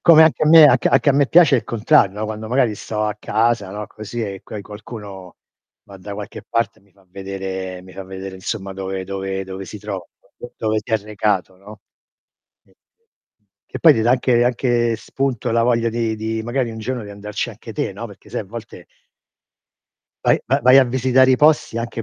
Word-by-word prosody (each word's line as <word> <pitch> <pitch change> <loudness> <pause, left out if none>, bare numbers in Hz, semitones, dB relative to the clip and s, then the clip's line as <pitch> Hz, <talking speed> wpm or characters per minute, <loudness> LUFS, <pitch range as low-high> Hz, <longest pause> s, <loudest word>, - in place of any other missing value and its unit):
Come 160 -2 +7
anche 160 -1 +3
a 155 - +4
me, 160 -1 +9
anc 130 -4 +5
anche - - +3
a - - +3
me 140 0 +3
piace 165 -6 +6
il - - -2
contrario, 105 -3 +2
no, - - -1
quando 110 0 -6
magari 125 -4 +2
sto 105 +1 -3
a 105 -1 -1
casa, 110 -2 0
no, 105 +1 -6
così 110 +2 -7
e 100 -3 -5
coi 105 -2 -8
qualcuno, 105 -3 -10 0.5
va 100 - -13
da 100 +2 -8
qualche 105 0 -8
parte 115 0 -1
e - - -28
mi 100 - -29
fa 100 -1 -26
vedere 95 -1 -6
mi 95 0 -14
fa 95 - -7
vedere 95 0 -8
insomma 95 +1 -5
dove 95 0 -5
dove 95 0 -4
dove 95 0 -7
si 105 - -8
trova, 100 -3 -6 0.3
d 120 - -10
dove 110 -1 0
si 115 - -9
è - - +5
recato, 100 -3 -2
no. 105 +3 -14 0.8
Sì. - - -29 0.9
Che - - -8
poi 160 -3 +7
ti 110 - 0
dà 120 - +3
anche 125 -1 +3
anche 120 -2 +1
spunto 125 -1 -2
la 115 - +2
voglia 115 -1 +2
di 115 -1 -1
di 110 +1 -3
magari 120 0 -2
un 110 - -8
giorno 125 +1 -4
di 100 - -10
andarci 105 +3 -5
anche 115 0 -11
te, - - -2
no, 115 +4 -7
perché 105 +1 -16
sai 120 - -3
a 105 - -12
volte 110 -4 -10 1.4
vai - - +4
va 135 - +3
vai 130 +2 +7
a 135 - +6
visitare 130 +1 +3
i 130 - +4
posti 150 -5 +3
anche 115 0 -4
110 Hz, 210 wpm, -20 LUFS, 100-120 Hz, 1.4 s, me